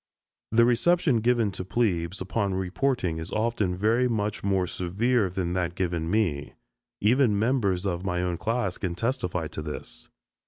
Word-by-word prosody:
The 115 +1 +5
reception 135 +3 +3
given 115 -2 +2
to 95 - -6
"plebes" 95 -4 -1
upon 100 0 -1
reporting 95 -1 -1
is 80 +4 -6
often 110 -5 0
very 115 +6 +2
much 105 -3 -2
more 95 -2 +1
severe 100 +5 0
than 90 -1 -2
that 90 -1 -1
given 85 -3 -1
me. 90 -9 0 0.5
Even 115 0 +3
members 100 -5 +1
of 90 -2 -2
my 90 -2 -1
own 90 -2 -2
class 110 -3 -1
can 90 -3 -2
testify 90 - -1
to - - -6
this. 75 -1 -6
100 Hz, 155 wpm, -26 LUFS, 90-115 Hz, 0.5 s, The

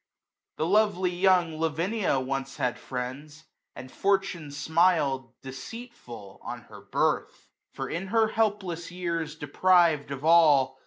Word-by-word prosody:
The 155 - 0
lovely 190 -1 +2
young 175 -3 +2
Lavinia 165 +1 0
once 135 +1 -4
had 125 -1 -1
friends. 140 +5 -6 0.3
And 130 +1 -10
fortune 195 -5 0
smil'd, 145 -4 +1
deceitful,, 135 - -10
on - - -7
her - - -14
birth; - - -2 0.2
For, - - -4
in 175 +4 -4
her 220 +2 +2
helpless 205 -7 -1
years 170 -4 -3
deprived 160 0 +2
of 140 +1 -6
all. 145 -6 +5
165 Hz, 120 wpm, -27 LUFS, 135-185 Hz, 0.3 s, all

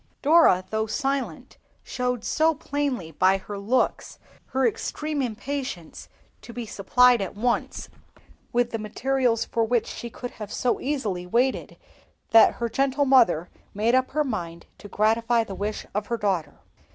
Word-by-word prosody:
Dora, 290 - +5
though 220 0 -1
silent, 275 +3 -3 0.2
showed 250 -2 -2
so 320 0 +2
plainly 280 - -3
by 185 +5 +3
her 205 +2 -8
looks 240 +6 -1 0.3
her 265 0 0
extreme 300 +6 -3
impatience 250 - -5 0.3
to - - -11
be 235 0 -6
supplied 245 +4 +3
at 195 - -4
once 235 +3 -1 0.6
with 240 0 +1
the 225 - -3
materials 240 +2 0
for 230 - 0
which 235 0 +1
she 235 - -7
could 245 +1 -7
have 210 -1 -6
so 250 -1 0
easily 215 -11 -2
waited 245 +7 0 0.5
that 225 -1 +7
her 235 - -2
gentle 275 +4 +1
mother 230 - +4 0.2
made 220 +4 +1
up 260 0 +2
her 300 +2 0
mind 170 - -5
to - - -10
gratify 230 +3 +2
the 200 - -8
wish 210 +2 -4
of 210 +1 -2
her 235 - -1
daughter. 185 -9 -2
235 Hz, 150 wpm, -25 LUFS, 210-260 Hz, 0.6 s, that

